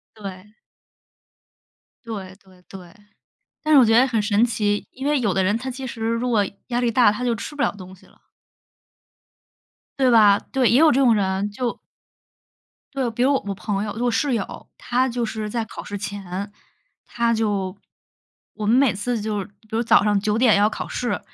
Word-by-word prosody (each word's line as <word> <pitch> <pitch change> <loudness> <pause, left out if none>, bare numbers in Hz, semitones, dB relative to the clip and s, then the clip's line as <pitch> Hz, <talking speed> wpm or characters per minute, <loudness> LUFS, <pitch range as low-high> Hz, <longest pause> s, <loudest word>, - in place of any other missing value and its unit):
对。 200 0 -10 1.5
对 195 -4 -7
对 185 -1 -21
对， 180 -3 -12 0.7
但 310 0 0
是 285 - +8
我 255 - +7
觉 225 +1 +4
得 260 - +5
很 230 -4 0
神 205 +2 +2
奇， 205 -3 -1
因 265 +2 -7
为 295 -2 +2
有 205 -5 +1
的 190 -1 +1
人 205 +3 +1
他 260 +3 -4
其 260 +1 -6
实 235 -2 -8
如 230 +2 -1
果 210 -3 +3 0.2
压 240 0 0
力 240 -1 +1
大， 230 -3 +4
他 250 +4 -4
就 235 -1 +1
吃 260 +6 -7
不 290 - -2
了 - - +2
东 190 -2 -12
西 185 - -20
了。 - - -25 1.8
对 260 -1 +4
吧？ 210 -3 +6
对， 260 -3 +2
也 245 - +4
有 315 -1 +6
这 270 - +2
种 245 -4 +5
人， 195 0 0
就 240 +2 -3 1.2
对， 260 -3 -1
比 240 +2 -1
如 280 +2 +3
我 270 - +1
我 195 - -3
朋 200 +1 -3
友 210 - -4
我 245 0 +1
室 260 +2 0
友， 205 - -6
她 255 +2 0
就 240 0 -2
是 215 -1 -4
在 230 0 -2
考 - - -9
试 205 - -6
前， 200 0 -6 0.6
她 235 -1 0
就 205 -4 -1 0.8
我 210 -1 -4
们 230 - +4
每 265 -4 +4
次 225 +4 -2
就 210 -1 -2
是 195 - -4
比 210 +1 -24
如 225 +1 0
早 225 -3 +4
上 205 -1 +2
9 210 +2 0
点 235 -3 +5
要 205 +1 +3
考 - - -6
试， 245 -1 -2
220 Hz, 210 characters per minute, -22 LUFS, 205-245 Hz, 1.8 s, 是